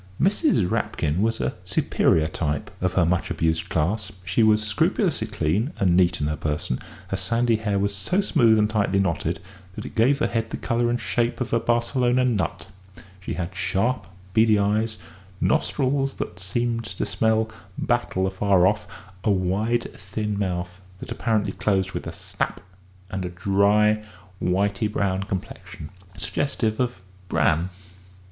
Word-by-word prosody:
Mrs. 200 - +3
Rapkin 80 0 -1
was 115 +1 +1
a 65 -1 -1
superior 80 - +2
type 75 -2 -2
of 95 0 +1
her 95 -3 +3
much 90 +1 0
abused 80 +2 0
class. 95 +6 0
She 90 +6 +1
was 110 -1 +4
scrupulously 110 -2 +1
clean 105 - 0
and 90 -4 +3
neat 90 -1 +3
in 75 - 0
her 75 +1 0
person; 75 -5 -2 0.3
her - - -1
sandy 115 0 +2
hair 105 -2 -1
was 100 +1 0
so 100 - 0
smooth 120 - +4
and 105 0 +4
tightly 105 -3 +1
knotted 85 -3 0 0.4
that - - -6
it - - -8
gave 125 +5 +4
her 150 - +1
head 115 -1 -1
the - - -4
colour 120 0 0
and 120 +1 0
shape 120 +1 -1
of 125 -2 -3
a 115 - +4
Barcelona 120 +2 +2
nut; 105 -9 -1 0.5
she 95 - -5
had 90 0 -4
sharp, 95 +7 0 0.3
beady 110 0 +5
eyes, 105 +2 +1 0.4
nostrils 135 +1 +1
that - - -5
seemed 115 +5 -1
to 95 - -3
smell 110 0 +1 0.3
battle 120 -6 0
afar 95 -1 +3
off, 105 +2 +1 0.4
a - - +1
wide, 100 +5 +1
thin 105 +2 -4
mouth 90 -2 -3 0.2
that 115 - -9
apparently 110 -4 0
closed 95 -2 0
with - - -5
a - - -4
snap, - - -4 0.5
and 95 -1 -3
a 90 - -3
dry, 100 +4 +3 0.4
whity 100 +3 +1
brown 95 -2 0
complexion 95 -5 -6 0.3
suggestive 110 0 -1
of 125 -7 -1 0.3
bran. 85 +2 +2
105 Hz, 155 wpm, -24 LUFS, 95-115 Hz, 0.5 s, beady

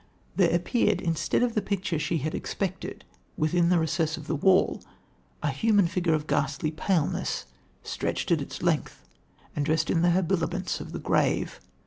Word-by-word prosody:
"There 180 -4 +4
appeared, 175 +8 +2
instead 165 +6 0
of 245 -2 +1
the 215 - +1
picture 190 -5 -2
she 160 +2 0
had 155 +1 -2
expected, 190 -2 -4 0.3
within 170 +2 +2
the 180 - +4
recess 160 0 0
of 155 - -9
the 160 - -1
wall, 185 +5 +3 0.6
a - - +1
human 210 -4 +3
figure 170 -2 +1
of 150 -1 -3
ghastly 150 +1 0
paleness, 160 0 -1 0.4
stretched - - -2
at - - +3
its - - -7
length, - - -1 0.5
and 150 - 0
dressed 155 +2 +1
in 165 - +2
the 175 - +4
habiliments 180 0 0
of - - -8
the - - -4
grave. - - 0
170 Hz, 165 wpm, -27 LUFS, 155-190 Hz, 0.6 s, There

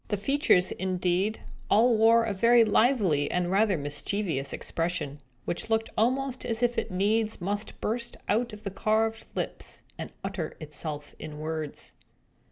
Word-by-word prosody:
The 205 - -1
features, 205 - +3
indeed, 185 +3 0 0.3
all 230 +3 +5
wore 225 +1 +5
a 225 -2 -1
very 230 +4 +5
lively 210 - +3
and 180 0 0
rather 200 -1 +3
mischievous 145 +1 -2
expression, 165 -4 -3 0.2
which 175 - -3
looked 225 0 +1
almost 260 +3 0
as 230 -1 -2
if 240 0 +2
it - - -4
needs 210 +4 +1
must 205 +3 -4
burst 235 +2 -3
out 235 +3 +1
of 210 0 -11
the 200 - -4
carved 220 +3 0
lips, - - -5 0.2
and - - -5
utter 190 -4 -4
itself 150 -1 -5
in 150 -1 -7
words. 155 -1 -5
205 Hz, 150 wpm, -28 LUFS, 175-225 Hz, 0.3 s, all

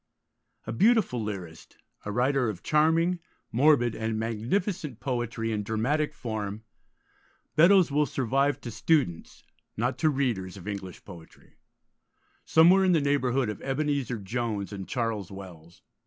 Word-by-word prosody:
A 110 - -4
beautiful 200 - +2
lyrist, 90 -6 -7 0.3
a 105 - -3
writer 125 +2 +1
of 95 -4 -7
charming, 165 +3 +2 0.3
morbid, 125 -2 +4
and 110 0 -2
magnificent 120 - -2
poetry 120 -3 -2
in 105 -1 -1
dramatic 135 +9 -1
form, 110 -3 -5 0.9
Beddoes 175 +1 +6
will 150 +1 +2
survive 135 +3 0
to 120 - -6
students, 110 - 0 0.3
not 125 +4 -1
to 155 - +3
readers, 115 -10 -1
of 95 - -11
English 95 -3 -6
poetry, 85 -5 -14 0.9
somewhere 175 +4 +6
in 185 -1 +4
the 165 - +4
neighbourhood 135 -3 +1
of 105 -2 -5
Ebenezer 135 -3 -1
Jones 105 0 -3
and 95 -3 -6
Charles 110 -3 -2
Wells. 90 -4 -12
120 Hz, 130 wpm, -27 LUFS, 105-145 Hz, 0.9 s, Beddoes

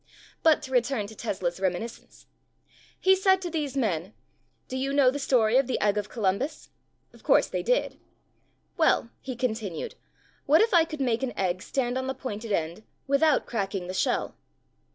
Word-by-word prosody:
But 315 -2 +4
to 265 - -8
return 245 -3 +1
to 220 +2 -11
Tesla's 185 -5 -3
reminiscence. 190 +5 -4 0.7
He 380 0 +5
said 380 0 +3
to 350 - -4
these 295 -4 -2
men, 195 -6 -1 0.5
"Do 255 - -6
you 270 +1 -1
know 275 -3 +5
the 285 - -4
story 245 -4 +3
of 265 -2 +3
the 260 - -1
Egg 205 -1 +2
of 210 0 -2
Columbus?" 235 +8 -2 0.4
Of - - -17
course - - +4
they - - -3
did. - - 0 0.8
"Well," 315 -8 +2
he 260 -2 -5
continued, 220 -8 -3 0.5
"what 300 +3 +6
if 450 0 +3
I 335 -2 +6
could 310 -3 -6
make 240 -3 +1
an 245 -5 -3
egg 185 -1 0
stand 255 +1 -1
on 260 - -4
the 265 - -2
pointed 230 -4 -6
end 170 +1 -1 0.2
without 280 +1 +3
cracking 195 -4 -3
the 185 - -5
shell?" - - 0
250 Hz, 175 wpm, -27 LUFS, 205-280 Hz, 0.8 s, what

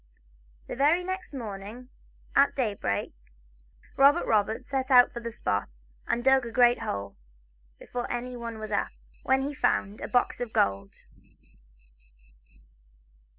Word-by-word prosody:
The - - -6
very 300 +7 +3
next 375 0 -5
morning, 225 -1 -7 0.5
at 280 - +4
daybreak, 210 - -2 0.8
Robert 285 +5 +5
Roberts 215 0 0
set 265 -1 -2
out 250 -2 +6
for 235 - -5
the 235 0 -5
spot, 100 - -3 0.2
and 240 - 0
dug 265 0 +4
a 235 - -6
great 245 0 +4
hole, 100 0 -4 0.6
before 245 -1 -5
anyone 240 -2 -5
was 215 0 -7
up, 205 - 0 0.3
when 265 0 +2
he 285 +2 -3
found 205 -6 0
a - - -4
box 245 0 0
of 240 -2 -4
gold. 100 0 0
240 Hz, 130 wpm, -27 LUFS, 210-265 Hz, 0.8 s, out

